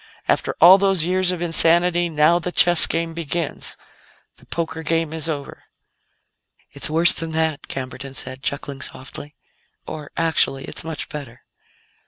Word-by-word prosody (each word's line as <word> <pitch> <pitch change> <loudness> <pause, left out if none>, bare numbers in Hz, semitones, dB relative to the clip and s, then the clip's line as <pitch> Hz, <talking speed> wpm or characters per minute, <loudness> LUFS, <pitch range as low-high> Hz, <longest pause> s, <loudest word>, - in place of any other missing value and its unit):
After - - 0
all 185 +3 +8
those 195 -4 +2
years 185 +1 0
of 175 -1 -4
insanity, 175 +1 +2
now 155 +2 +2
the 180 +1 -5
chess 175 -1 +7
game 165 0 -3
begins; 165 -1 -5 0.6
the - - -15
poker 165 -1 -4
game 165 -1 -2
is 160 0 -3
over." 145 -3 -7 1.1
"It's - - +1
worse 165 +2 +4
than 165 -1 -5
that," 160 -2 -2
Camberton 135 +1 -7
said, 130 0 -3
chuckling 140 0 -5
softly. 145 +3 -8 0.5
"Or, 150 -2 -8
actually, 160 -4 0
it's - - -4
much 160 -2 -6
better." 130 -5 -10
160 Hz, 145 wpm, -20 LUFS, 145-170 Hz, 1.1 s, all